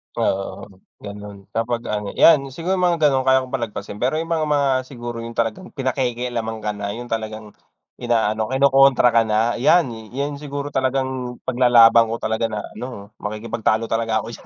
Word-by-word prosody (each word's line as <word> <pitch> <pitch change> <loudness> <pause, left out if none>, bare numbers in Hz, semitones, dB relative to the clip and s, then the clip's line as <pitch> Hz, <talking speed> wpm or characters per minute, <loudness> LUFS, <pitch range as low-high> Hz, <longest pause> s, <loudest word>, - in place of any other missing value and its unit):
Oo, 95 0 -2 0.4
ganun. 100 0 -8 0.2
Kapag 115 +1 -2
ano, 105 -1 -3
'yan, 140 -4 +5
siguro 180 +4 -2
mga 175 -1 +3
gano'n 135 -3 +3
kaya 130 0 +4
kong 130 - -11
palagpasin. 105 -4 -4
Pero 130 +5 0
yung 165 +1 -3
mga 160 -2 +1
mga 145 -2 +2 0.2
siguro 120 -2 -7
yung 115 0 -7
talagang 115 - -2
pinapakialaman 120 -4 -2
ka 105 - -1
na, 100 0 -5
yung 120 0 -8
talagang 110 -1 -4 0.5
inaano, 110 -2 0
kinokontra 135 -1 +4
ka 115 - +4
na. 110 +2 +1
'Yan, 150 -1 +4 0.2
'yan 140 +1 -3
siguro 145 0 -5
talagang 130 -1 -2
paglalaban 120 -2 +5
ko 115 - -2
talaga 110 +1 -1
na 105 -1 -4 0.2
ano, 110 -5 -8
makikipagtalo 110 +1 -1
talaga 115 -1 0
ako - - -9
diyan. - - -12
120 Hz, 165 wpm, -21 LUFS, 110-135 Hz, 0.5 s, yan